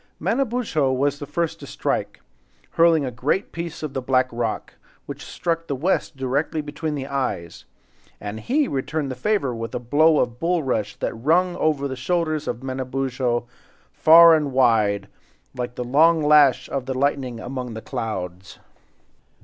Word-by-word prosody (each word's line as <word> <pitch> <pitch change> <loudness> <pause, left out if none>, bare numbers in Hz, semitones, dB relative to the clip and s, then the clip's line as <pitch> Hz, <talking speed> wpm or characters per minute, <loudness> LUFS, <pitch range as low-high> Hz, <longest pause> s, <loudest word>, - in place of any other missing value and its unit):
Manabozho 225 - 0
was 140 +2 0
the 145 - -7
first 170 -2 -2
to - - -10
strike—hurling 135 - -1
a 130 - -3
great 130 - -1
piece 170 -1 -6
of 150 -3 -4
the 130 - -2
black 130 0 +2
rock, 115 -2 -3 0.3
which - - -8
struck 165 -1 -3
the 140 - -2
West 155 0 -1
directly 140 +5 -1
between 150 +1 -4
the 135 -2 -4
eyes, 130 - -4 0.5
and 105 +1 -6
he 280 - +1
returned 140 - -2
the - - -4
favor 140 - 0
with 115 0 -5
a - - -1
blow 150 +6 +3
of 120 -3 -1
bulrush 135 - -1
that - - -3
rung 170 +9 +1
over 145 -3 +1
the 130 - -5
shoulders 155 +2 -1
of 120 - -4
Manabozho, 130 -2 -2 0.5
far 165 +1 +8
and 150 -3 +1
wide, 110 -6 +2 0.5
like 125 -1 -4
the 125 - -3
long 155 +6 +4
lash 150 -3 +5
of 135 -2 -3
the 130 - -2
lightning 130 -3 -1
among 125 -1 -5
the - - -5
clouds. 95 -3 -5
135 Hz, 155 wpm, -23 LUFS, 125-160 Hz, 0.5 s, far